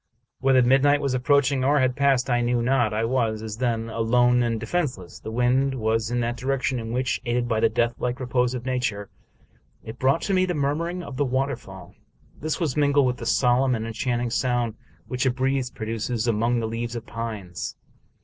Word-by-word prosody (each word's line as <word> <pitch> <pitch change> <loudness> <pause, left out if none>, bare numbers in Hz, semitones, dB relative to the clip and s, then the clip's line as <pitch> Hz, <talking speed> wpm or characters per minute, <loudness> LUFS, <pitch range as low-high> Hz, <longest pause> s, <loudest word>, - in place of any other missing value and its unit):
Whether 130 -1 +4
midnight 135 +3 +4
was 140 -2 -1
approaching, 135 +1 +2
or 145 +3 +3
had 130 -1 +2
passed, 135 -2 +2
I 120 -2 +2
knew 120 0 +1
not. 125 -3 +2
I 110 +1 0
was, 115 -3 0
as 110 -1 -6
then, 115 -2 -1
alone 120 +2 +2
and 115 -2 0
de 115 - -5
fenseless. 125 - -3
The - - -6
wind 125 +4 +1
v/as 110 -1 0
in 120 0 0
that 120 +1 -2
direction 130 0 -1
in 115 0 -5
which, 125 +1 -1
aided 120 0 0
by 110 -2 0
the 115 - +4
deathlike 120 +2 -1
repose 125 -1 0
of 125 0 -6
nature, 125 -6 -2 0.7
it 110 - -9
brought 135 +5 +2
to 200 - -1
me 185 0 +3
the 180 - -1
mur 140 -1 +1
mur 170 +3 -3
of 130 - -8
the 145 - +2
waterfall. 125 -9 -3 0.5
This 155 0 -2
was 155 -7 -1
mingled 145 -1 +3
with 125 -1 0
that 115 - -6
solemn 125 +1 +3
and 110 0 -3
enchanting 120 +1 -2
sound 120 -2 0 0.3
which 125 +1 -1
a - - +5
breeze 130 0 0
produces 115 +1 -3
among 115 +2 +1
the 115 - -2
leaves 115 +1 -4
of 115 -1 -6
pines. 110 -6 -5
125 Hz, 200 wpm, -24 LUFS, 115-135 Hz, 0.7 s, a